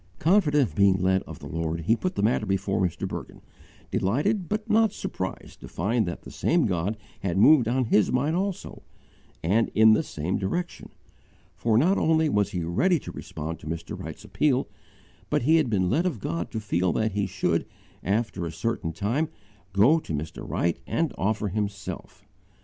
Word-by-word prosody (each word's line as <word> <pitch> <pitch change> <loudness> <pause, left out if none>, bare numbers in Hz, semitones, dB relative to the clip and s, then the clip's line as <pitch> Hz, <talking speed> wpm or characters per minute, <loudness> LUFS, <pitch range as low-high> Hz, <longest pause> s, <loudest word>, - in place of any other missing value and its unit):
Confident 155 -5 +3
of - - -16
being 100 -2 +5
led 95 +1 +2
of - - -8
God, 80 0 -3
he 110 +8 +3
put 185 +9 -3
the 100 - -1
matter 105 -1 +1
before 95 +1 0
Mr. 85 -3 -1
Bergin, - - -7 0.5
delighted 160 - 0
but 215 +1 -2
not 220 -1 +4
surprised 95 - -6
to - - -10
find 110 +4 0
that 85 - -5
the - - -10
same 170 -1 +1
God 95 +2 -1 0.2
had 95 -2 -2
moved 125 +3 +6
on 125 +2 +1
his 105 -3 +3
mind 145 +6 +1
also, 195 0 -3 0.6
and 105 +8 +2
in 110 0 +7
the 110 - +3
same 80 +5 -3
direction; 170 - -3 0.7
for 110 -2 +1
not 180 +11 +3
only 160 -1 +3
was 105 -6 +1
he 90 -2 -3
ready 170 - +2
to - - -8
respond 80 +2 -6
to - - -11
Mr. 80 +1 -5
Wright's - - -8
appeal, 135 -3 +1 0.6
but - - +1
he 160 +5 +5
had 150 -6 +2
been 95 -4 +1
led 170 +4 +2
of 155 -11 -3
God 85 -2 -3
to 110 - -4
feel 95 -4 0
that 110 0 0
he 100 -1 -1
should, 90 -3 -1 0.4
after 100 -3 -1
a - - -5
certain 80 0 -2
time, 120 - -1 0.4
_go 125 - +4
to - - -5
Mr. 75 +2 -6
Wright 85 -1 0
and 165 -2 0
offer 105 +1 -1
himself. 100 0 -5
105 Hz, 185 wpm, -26 LUFS, 90-150 Hz, 0.7 s, in